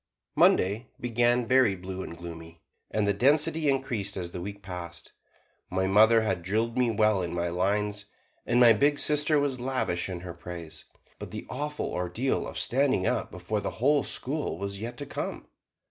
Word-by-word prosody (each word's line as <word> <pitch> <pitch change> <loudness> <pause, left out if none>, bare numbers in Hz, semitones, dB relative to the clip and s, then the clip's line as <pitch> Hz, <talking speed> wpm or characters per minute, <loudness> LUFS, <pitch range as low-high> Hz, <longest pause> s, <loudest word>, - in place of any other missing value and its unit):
Monday 105 +6 +3
began 120 0 +2
very 125 -4 +4
blue 95 +1 -6
and 85 -2 -7
gloomy, 80 -1 -9 0.3
and 105 -1 0
the 100 - +3
density 150 +7 +2
increased 120 -7 -1
as 85 -2 -4
the 90 - -6
week 100 +2 -7
passed. 90 -3 -8 0.6
My 95 +1 0
mother 110 +4 +5
had 95 -5 -1
drilled 110 +6 -1
me 125 -2 +2
well 110 -3 +2
in 85 -1 -3
my 85 0 -1
lines, 105 +3 -1 0.4
and 120 - +2
my 120 -2 +8
big 145 +7 +2
sister 150 +1 +3
was 140 -3 -1
lavish 120 -9 -1
in 90 -2 -5
her 90 -1 -7
praise, 85 -1 -9 0.3
but - - -7
the - - -7
awful 150 +2 -3
ordeal 90 +9 -1
of - - -7
standing 130 -7 +1
up - - 0
before 90 +5 -3
the - - -3
whole 140 +4 +3
school 145 - -3
was 100 +1 -4
yet 120 +2 -5
to 145 - -5
come. - - -5
105 Hz, 175 wpm, -28 LUFS, 90-130 Hz, 0.6 s, my